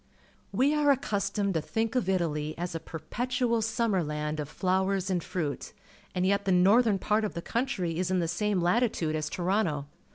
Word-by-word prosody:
We 280 +3 +3
are 300 -1 +3
accustomed 205 -6 +1
to 160 - 0
tliink 225 +8 -2
of 240 -7 +1
Italy 155 -4 0
as 175 +1 -3
a 165 - -3
perpetual 235 +9 -2
sirmmer 220 -4 +1
land 150 0 -3
of 150 -1 -4
flowers 190 +1 0
and 175 -3 0
fruit, 155 -6 -4 0.4
and 180 0 +1
yet 200 +1 +2
the 195 - +2
northern 200 +4 +5
part 210 +3 +1
of 210 - -3
the 170 - -3
country 185 -10 -1
is 185 0 0
in 185 - +1
the 170 -2 +1
same 200 +3 0
latitude 175 -4 +1
as 155 -1 -2
Toronto. 175 -6 0
190 Hz, 185 wpm, -29 LUFS, 165-220 Hz, 0.4 s, northern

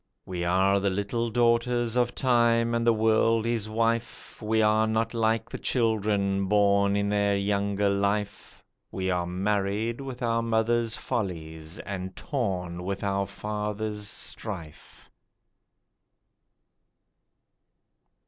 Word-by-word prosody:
We 90 -2 -4
are 95 +3 +3
the 100 0 +1
little 100 +5 -1
daughters 120 0 +1
of 120 -1 +1
Time 120 -2 +3
and 115 0 0
the - - +7
World 110 0 +2
his 115 -2 -1
wife, 115 +2 -2
We 110 +1 +1
are 110 0 +3
not 110 +1 0
like 115 -1 +1
the - - -7
children, 105 -4 +1
born 100 0 +3
in 100 0 +1
their 100 -1 +2
younger 100 0 0
life, 100 +1 -2 0.3
We 95 0 -2
are 90 -1 -1
marred 100 +5 -1
with 130 -2 -6
our 115 -1 +1
mother's 115 0 +1
follies 80 -8 -4
and 95 -1 -6
torn 95 - -3
with 100 +2 -4
our 100 -1 0
father's 105 +1 -3
strife. 90 -8 -8
105 Hz, 120 wpm, -27 LUFS, 100-115 Hz, 0.3 s, the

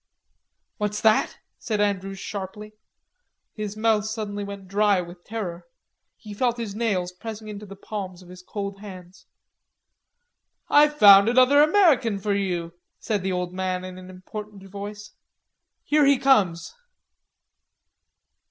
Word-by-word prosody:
"What's 210 0 -2
that?" 220 -1 +3 0.2
said 215 -2 -2
Andrews 195 -1 -1
sharply. 205 +2 -7 0.8
His 210 -1 -6
mouth 215 -1 +2
suddenly 215 -2 -4
went 200 -1 -8
dry 205 0 +2
with 175 0 -8
terror. 180 -6 -6 0.5
He 210 -2 -10
felt 240 +3 0
his 225 -4 -5
nails 200 -5 -1
pressing 215 +3 -8
into 210 0 -8
the 195 - -10
palms 190 -3 -7
of 175 - -17
his 180 0 -12
cold 200 +1 -6
hands. 185 -3 -12 1.4
"I've 295 0 +5
found 200 -1 +8
another 255 +4 +5
American 300 - +4
for 200 +1 -1
you," 175 -4 -2 0.3
said 210 -3 -2
the 190 +1 -2
old 180 -1 -3
man 185 0 -2
in 185 0 -9
an 185 0 -12
important 200 +2 -9
voice. 205 +2 -8 0.7
"Here 295 -1 +3
he 280 -1 +5
comes." 205 - +2
205 Hz, 135 wpm, -24 LUFS, 185-220 Hz, 1.4 s, found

